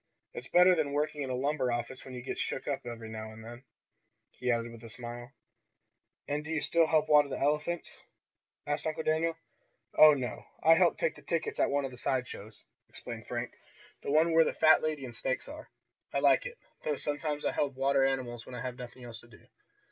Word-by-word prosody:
It's 125 - -7
better 180 +1 +6
than 150 -4 -1
working 150 0 -1
in 135 - -3
a 130 - -1
lumber 135 -1 0
office 120 +2 -4
when 130 -1 -9
you 125 - -7
get - - -4
shook - - -3
up 135 -3 -3
every 115 -1 -7
now 110 0 -7
and 110 +1 -12
then," 120 +2 -10 0.7
he 125 - -4
added 115 0 -1
with 115 0 -12
a 115 - -9
smile. 120 +2 -8 1.0
"And 145 +1 -2
do 150 - -9
you 160 -1 0
still 165 +1 +3
help 155 -1 +2
water 150 -1 +6
the - - -3
elephants?" 150 +4 -1 0.6
asked 145 +1 -1
Uncle 155 0 -2
Daniel. 160 +1 +1 0.6
"Oh, 155 -1 +8
no, 125 -3 -5 0.2
I 165 - +8
help 165 - +4
take - - -2
tickets 445 -1 -1
at - - +3
one 140 0 0
of 135 - -5
the 125 - -11
side 130 -1 0
shows," 105 -1 -10 0.3
explained - - -8
Frank. - - -4 0.5
"The - - -5
one 160 +3 +4
where 165 0 +7
the - - -1
fat 155 0 +5
lady 155 -3 -2
and 120 -2 -9
snakes 130 +2 -2
are. 310 +2 -10 0.4
I - - -1
like - - +4
it, 485 -1 -10 0.2
though 150 - -1
sometimes 150 +1 -2
I - - +2
help 140 -2 -1
water 135 +1 +2
the 135 - +4
animals 120 -3 -4
when 125 - -8
I 120 - -5
have 125 -1 -5
nothing 125 0 -9
else 120 -1 -8
to 120 - -16
do. 110 -2 -18
135 Hz, 220 wpm, -31 LUFS, 120-155 Hz, 1.0 s, Oh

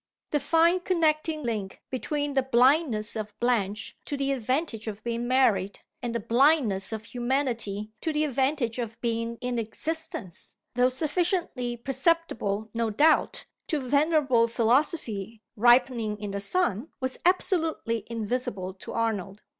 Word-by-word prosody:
The 295 - +2
fine 330 +5 +3
connecting 320 -4 +1
link 215 -5 -4
between 290 +2 -2
the 270 - +3
blindness 255 -3 +2
of 210 -1 -6
Blanche 225 -4 0
to 285 - -3
the 275 0 0
advantage 255 -2 -1
of 215 0 -6
being 235 0 -2
married, 215 -7 +2 0.2
and 240 -2 -3
the - - +1
blindness 235 -5 +3
of 220 0 -5
humanity 240 -5 -1
to 320 - 0
the 305 0 +1
advantage 265 -3 0
of 230 -1 -5
being 230 0 -2
in 245 -1 -1
existence, 230 - -5 0.2
though 250 +1 +3
sufficiently 300 -4 -1
perceptible 250 - 0
no 230 -1 0
doubt 300 +9 +3 0.2
to 310 - 0
venerable 280 -3 +3
Philosophy 230 - 0
ripening 240 -2 +3
in 205 -1 -5
the 200 - -3
sun, 235 - 0
was 260 0 -3
absolutely 325 - +1
invisible 215 -5 -3
to 190 - -9
Arnold. 210 -3 -2
245 Hz, 135 wpm, -27 LUFS, 220-290 Hz, 0.2 s, fine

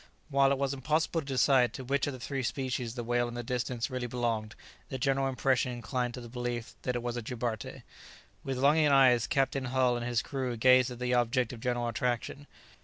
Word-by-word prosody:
While 140 -1 +4
it 140 - +2
was 140 0 0
impossible 155 +4 0
to - - -12
decide 130 -2 +3
to 130 - -6
which 135 +2 0
of 145 - -2
the 130 - -8
three 135 +3 -3
species 130 -2 -3
the 120 - -4
whale 120 +1 +1
in 120 - -7
the 120 - -4
distance 125 +1 -2
really 125 -1 -3
belonged, 115 -3 -2 0.3
the 130 - -3
general 135 +1 +1
impression 130 0 +1
inclined 120 +1 -3
to 125 - -7
the 120 - -9
belief 120 -1 -4
that 125 - -2
it 120 - -2
was 120 0 -3
a - - -2
jubarte. 115 -2 -4 0.6
With 135 -1 -3
longing 150 +4 +4
eyes 130 -4 +5
Captain 135 -1 0
Hull 125 -1 +2
and 120 - -3
his 120 -2 0
crew 130 -4 -3
gazed 130 +1 +5
at 125 - -7
the 125 0 -1
object 120 0 +1
of 120 - -8
general 120 0 -1
attraction. 125 +4 -2
125 Hz, 215 wpm, -30 LUFS, 120-135 Hz, 0.6 s, eyes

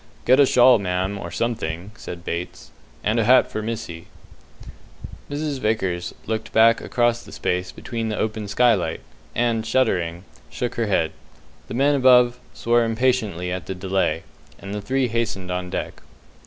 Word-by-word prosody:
"Get 130 +3 +5
a 140 - +7
shawl, 125 -2 +6
ma'am, 95 +1 -2
or 85 - -6
something," 90 -3 -3
says 90 - -7
Bates, 85 +1 -6 0.3
"and 110 +3 +1
a - - +3
hat 125 +4 +5
for 110 - -3
missy." 110 -7 -5 1.2
Mrs. 145 -1 -3
Vickers 95 -7 -1
looked 110 0 -3
back 115 +1 +5
across 120 -1 +1
the - - -14
space 90 +1 -2
beneath 115 -2 -4
the 105 - -3
open 110 -1 -2
skylight, 100 -6 +2 0.3
and 115 -1 +1
shuddering, 90 -8 0 0.3
shook 120 - -3
her 115 -2 -1
head. 80 -5 +1 0.6
The - - -6
men 140 +3 +3
above 125 -2 +5 0.2
swore 120 0 +2
impatiently 115 -6 0
at 90 -4 -4
the 95 - -4
delay, 95 -2 -1 0.3
and 100 0 -8
the 105 - -3
three 130 +4 0
hastened 110 -6 -2
on 90 0 -3
deck. - - -5
110 Hz, 155 wpm, -22 LUFS, 90-120 Hz, 1.2 s, a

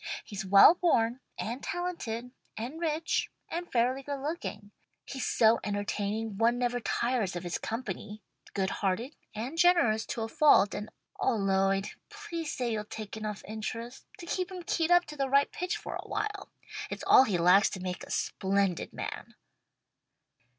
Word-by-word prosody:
He's 205 0 -5
well 195 - +8
born 255 -9 +2 0.2
and 240 +4 -4
talented 250 -10 -4 0.3
and 250 +9 -5
rich 325 0 0 0.2
and 345 +1 -4
fairly 250 +3 +2
good 280 0 -4
looking. 270 -9 -5 0.3
He's 265 -2 -4
so 225 0 +4
entertaining 205 +1 -2
one 235 +1 +3
never 245 0 0
tires 235 -5 0
of 175 - -4
his 175 -1 -3
company, 220 -2 -5 0.3
good 190 -1 0
hearted 220 +8 -2 0.2
and 255 +10 -4
generous 335 -12 +4
to 230 - -3
a - - -2
fault, 225 -4 +5
and 210 +1 -5 0.3
Oh 260 - +2
Lloyd, 195 -1 +1 0.2
please 415 -7 -5
say 245 -2 -2
you'll 210 -1 -2
take 215 0 -7
enough 215 -2 -5
interest 225 +3 -6
to 345 - -9
keep 365 +1 -2
him 365 -2 -7
keyed 330 -1 0
up 350 0 +5
to 300 - -9
the 275 -2 -1
right 280 +1 +4
pitch 360 +1 -2
for - - -6
awhile. 410 -2 -4 0.4
It's - - -5
all 260 - +8
he 200 -7 0
lacks 180 +4 +5
to 190 - -6
make 180 -1 -4
a - - -11
splendid 195 -2 0
man." - - -6
230 Hz, 165 wpm, -30 LUFS, 205-300 Hz, 0.4 s, well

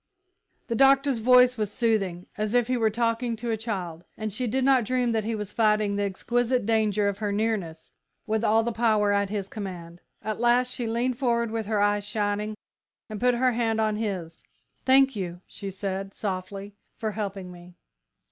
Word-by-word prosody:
The 235 - -2
Doctor's 275 +1 +4
voice 250 +1 +5
was 210 -2 -1
soothing, 205 -7 0
as 215 +2 -2
if 245 -1 +4
he 255 - +2
were 225 -2 +2
talking 230 +1 0
to 235 +1 -4
a - - +1
child, 185 -7 -5
and 215 -2 -4
she 250 +4 -2
did 260 +4 0
not 265 -2 +4
dream 250 +1 0
that 220 -2 0
he 225 0 -1
was 210 -1 -5
fighting 210 -2 +2
the 205 - -1
exquisite 240 +5 0
danger 215 -2 +2
of 200 0 -2
her 210 -2 -1
nearness 200 -7 -2 0.3
with 220 +1 -1
all 225 0 +4
the 235 - -1
power 215 -2 +2
at 200 -1 +1
his 200 -2 -3
command. 175 -5 -7 0.2
At 215 0 -3
last 245 +1 +3
she 240 -3 -3
leaned 240 +2 -1
forward 235 -3 +1
with 225 -2 -3
her 215 -1 0
eyes 205 0 +2
shining, 210 0 -1 0.6
and 215 - -5
put 250 0 +3
her 255 +1 +3
hand 225 -2 0
on 215 -1 +1
his. 190 -7 -4 0.4
"Thank 270 0 +5
you," 180 -3 -5
she 200 - -7
said, 195 0 -4
softly, 195 0 -5 0.2
"for 220 -2 -2
helping 195 -3 -5
me!" 175 0 -13
215 Hz, 190 wpm, -26 LUFS, 200-235 Hz, 0.6 s, voice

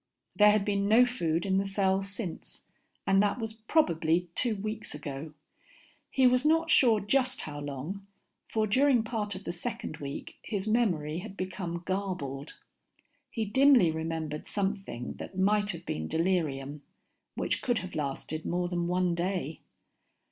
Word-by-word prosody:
There 210 0 +7
had 210 -1 +3
been 200 -1 +1
no 235 +3 +7
food 170 -9 -1
in 190 -1 +2
the - - +1
cell 195 -1 +2
since, 195 -2 -6 0.4
and 195 0 +4
that 205 +2 +1
was 225 -2 -4
probably 175 - +1
two 235 +1 +1
weeks 215 -2 -5
ago. 150 0 -6 0.7
He 265 - +3
was 250 0 +5
not 325 +2 +3
sure 230 -6 +5
just 260 +5 +1
how 145 -1 -6
long, 145 +8 -6 0.4
for 220 -1 +1
during 255 +2 +4
part 215 -3 -2
of 190 - -8
the 170 - -3
second 170 -2 -5
week 140 -1 -7
his 205 -2 -3
memory 175 -9 +1
had 200 +1 -9
become 180 -2 -4
garbled. 180 -8 -3 0.7
He 225 -2 -2
dimly 250 - +5
remembered 160 -1 -4
something 195 - -3
that 185 - -8
might 205 +2 +3
have 170 -3 -4
been 80 0 -3
delirium, 150 - -1 0.5
which - - -1
could 245 -2 +1
have 185 - -9
lasted 155 +1 -3
more 175 0 -1
than 175 -1 -1
one 180 0 +1
day. 170 -3 -2
190 Hz, 155 wpm, -29 LUFS, 160-215 Hz, 0.7 s, There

